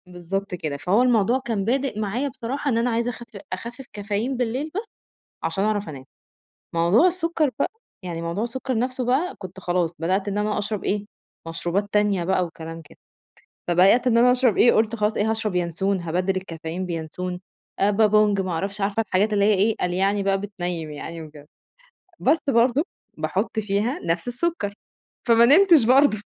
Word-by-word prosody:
بالضبط 180 +2 -4
كده، 155 -4 -4
فهو 185 - +2
الموضوع 245 0 +3
كان 225 -6 -2
بادئ 255 -1 0
معايا 220 +7 -1
بصراحة 270 +4 -4
إن 230 - +1
أنا 235 +2 +1
عايزة 235 +1 0
أخف 235 -3 -11 0.2
أخفِّف 235 +7 -7
كافيين 210 +5 -2
بالليل 255 +6 -2
بس، 425 +4 -2 0.6
عشان 195 - -1
أعرف 210 -3 0
أنام، 135 -3 -9 0.7
موضوع 170 - +4
السُكَّر 335 -4 +1
بقى، - - 0 0.3
يعني 170 -2 -5
موضوع 170 +6 -2
السُكَّر 255 0 -3
نفْسه 255 +1 -1
بقى، 265 +9 +1
كنت 190 -1 -9
خلاص 175 -2 0
بدأت 185 +5 0
إن 200 +1 -2
أنا 210 0 0
أشرب 210 0 -3
إيه، 205 +1 -1 0.4
مشروبات 175 +5 -2
تانية 205 -4 +2
بقى 185 0 +1
وكلام 165 -1 -8
كده، 150 - -19 0.7
فبدأت 190 +8 +4
إن 230 -2 +4
أنا 245 +1 +6
أشرب 250 -3 +2
إيه 240 - +6
قُلت 220 +1 +2
خلاص 210 -1 0
إيه، 215 +1 0
هاشرب 220 -3 -2
يانسون 180 +3 0
هابدِّل 180 +3 -1
الكافيين 170 -1 -5
بيانسون، 180 +2 -4 0.4
بابونج 210 0 +3
ما 185 -1 -3
أعرفش، 195 +5 -3
عارفة 200 +3 +1
الحاجات 205 +4 +1
اللي 200 -1 +3
هي 215 - +4
إيه، 210 +3 +2
قال 180 - -1
يعني 195 +2 +1
بقى 195 0 +2
بتنيم 175 -6 -4
يعني 165 +3 -7
وكده، 150 -1 -13 0.7
بس 300 +5 +3
برضه 250 +3 +3 0.3
باحط - - -2
فيها 210 +5 0
نفْس 170 +7 -1
السُكَّر، 245 -5 -2 0.5
فما 230 -1 +6
نمتش 325 - +6
برضه. 255 -2 +4
205 Hz, 170 wpm, -23 LUFS, 180-240 Hz, 0.7 s, أنا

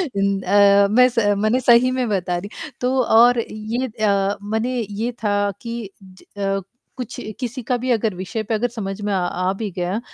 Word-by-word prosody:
इन 195 0 +1
अ, 200 +1 +5
मैं 250 +3 +6
स 230 -3 0
मने 215 +5 +2
सही 250 0 +5
में 255 -2 -1
बता 180 -3 -1
रही। 195 +4 -6 0.3
तो 250 +1 +1
और 235 +1 +5
ये 220 +4 -3
अ, 205 -3 0
मने 220 +5 -1
ये 220 +4 -3
था 205 -1 +1
कि 230 -4 -5
ज 185 -1 -17
अ, 195 0 -1 0.4
कुछ 250 -4 -6 0.2
किसी 250 0 -4
का 250 - +1
भी 255 - -3
अगर 220 -3 +1
विषय 190 +5 -4
पे - - +1
अगर 220 +3 +1
समझ 205 -4 -5
में 205 0 -2
अ, - - +1
आ 180 +1 -1
भी 215 -1 -3
गया, 180 +4 -1
215 Hz, 195 wpm, -21 LUFS, 200-240 Hz, 0.4 s, मैं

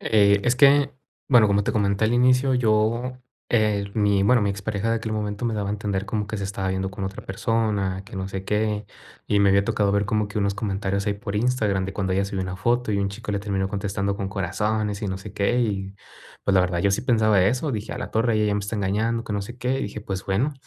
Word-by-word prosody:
Eh, 100 -2 +4
es 125 +1 +2
que, 140 +1 +5 0.4
bueno, 120 -5 +6
como 100 0 +2
te - - 0
comenté 100 0 +1
al 110 - +2
inicio, 125 +2 +4
yo, 115 +2 +1 0.3
eh, 105 -3 +2
mi 100 -2 +2
bueno, 120 +3 +4
mi 100 - +1
ex 100 +1 -6
pareja 105 +1 -1
de 115 - +2
aquel 110 -1 -4
momento 105 +1 -3
me 115 -2 0
daba 100 -2 -2
a - - -1
entender 100 -1 -2
como 105 -2 -2
que 110 - -4
se 100 - -3
estaba 95 -1 -3
viendo 95 0 -2
con 95 0 -5
otra 95 +2 -6
persona, 105 -3 -1
que 100 - -10
no 95 0 -3
sé 95 0 -5
qué. 105 0 0 0.4
Y 105 - +2
me 100 -1 +5
había 100 0 +3
tocado 105 -2 +1
ver 100 0 +2
como 105 0 0
que 105 - -4
unos 100 -1 0
comentarios 100 -1 -2
ahí 100 - +1
por 100 0 -5
Instagram 105 -5 +1
de 95 - -5
cuando 95 -1 -2
ella 95 +1 +1
subió 100 -1 -3
una 95 0 -4
foto, 120 +5 0
y 100 - +1
un 100 0 0
chico 105 +2 -7
le 100 - 0
terminó 100 -1 -2
contestando 100 0 -2
con 100 -2 -3
corazones 105 +2 -2
y 105 - -1
no 95 0 -3
sé 100 0 -10
qué, 105 +5 +1
y, 100 -4 -2 0.5
pues, 100 - +2
la 95 - +6
verdad 90 -1 0
yo 100 - +2
sí 100 +4 0
pensaba 110 -5 +3
eso. 125 +9 +1
Dije: 110 -1 -4
"A - - -6
la - - -5
torre, 115 +1 +1
ella 105 -1 +1
me 105 - 0
está 100 +2 -4
engañando, 110 +4 0
que 110 - -5
no 100 -1 -1
sé 120 +5 -9
qué". 125 +2 0
Y - - -2
dije, 105 +1 -6
pues, 95 -2 -5
bueno, 110 +10 +1
105 Hz, 260 wpm, -24 LUFS, 100-110 Hz, 0.5 s, bueno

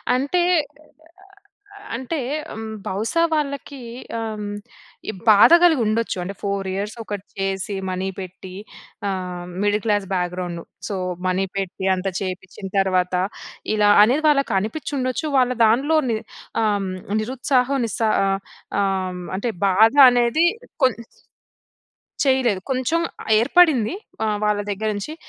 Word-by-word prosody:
అంటే 285 +8 +1 0.8
అ - - -18 0.7
అంటే 260 +6 -3 0.7
బహుసా 220 - 0
వాళ్ళకీ 280 -2 -3 0.4
ఆహ్, 220 -2 -4 0.7
ఈ - - 0 0.2
బాధ 210 +6 +7
కలిగి 320 -7 +5
ఉండొచ్చు. 220 -1 0
అంటే 190 +3 -5
4 200 -1 -2
ఇయర్స్ 205 +3 -3
ఒకటి 205 -2 -6
చేసి 195 +1 -2
మనీ 185 +1 -2
పెట్టి, 185 0 -9 0.5
ఆహ్, 180 -2 -4 0.2
middle 205 0 +1
class 205 -2 +1
background, 180 -1 -2 0.3
so, 205 - -3 0.3
money 185 +1 +1
పెట్టి 190 -1 -3
అంత 185 +1 -4
చేపించిన 190 0 -6
తర్వాత 185 -1 +1 0.6
ఇలా 210 -1 +4
అనేది 260 +8 +2
వాళ్ళకి 275 -2 +2
అనిపించి 220 +11 -5
ఉండొచ్చు. 255 +4 -2
వాళ్ళ 250 -1 +3
దాంట్లోని 260 +1 +2 0.5
ఆహ్, 205 -3 0 0.3
నిరుత్సాహం 255 +3 0
నిస్సా 225 0 -1 0.2
ఆహ్, 195 0 0 0.4
ఆహ్, 185 -2 -1 0.2
అంటే 230 +4 -1 0.2
బాధ 215 +5 +5 0.2
అనేది 245 +6 +3 0.4
కొం 255 -2 +5 1.3
చేయలేదు. 260 -7 +2
కొంచెం 260 +6 +1 0.4
ఏర్పడింది. 285 - +4 0.3
ఆహ్, 210 -1 0
వాళ్ళ 210 -1 +1
దగ్గర 215 +2 -2
నుంచి. 210 +10 -5
210 Hz, 120 wpm, -22 LUFS, 195-255 Hz, 1.3 s, బాధ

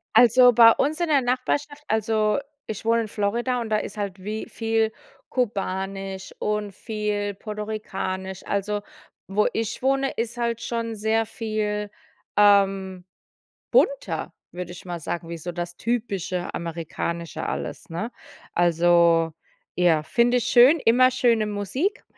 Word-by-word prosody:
Also, 245 +1 +7
bei 230 0 +9
uns 295 +7 0
in 345 - +1
der 285 -3 +4
Nachbarschaft, 285 +4 -1
also 215 +1 +1 0.3
ich 220 0 -6
wohne 230 0 +3
in 220 - -4
Florida, 235 +5 -1
und 230 - -5
da 215 - +2
ist 210 - -5
halt 195 -2 -4
wie 215 +2 -4
viel 225 -1 0 0.4
kubanisch 195 -4 -3
und 210 -1 -2
viel 210 -1 -3
puertorikanisch. 195 -3 -5
Also 205 +1 -1 0.5
wo 205 +2 +2
ich 225 +1 -3
wohne, 270 +1 +1
ist 235 +1 -4
halt 235 -1 -1
schon 230 -1 -3
sehr 220 +2 +1
viel, 215 -2 -3 0.5
ähm, 195 -3 +3 0.7
bunter, - - +1 0.2
würde 175 0 -6
ich 180 - -11
mal 175 -1 -5
sagen, 170 +2 -4
wie 170 0 -5
so 175 +3 -5
das 175 0 -5
typische 200 -6 -2
Amerikanische 170 0 -4
alles, - - -5
ne? 175 +8 -3 0.4
Also 170 -1 +4 0.4
ja, 170 -4 +3
finde 240 +8 +2
ich 240 - -1
schön. 255 +7 +6
Immer 255 +3 +6
schöne 230 -4 +2
Musik 210 - -2
210 Hz, 140 wpm, -24 LUFS, 190-235 Hz, 0.7 s, bei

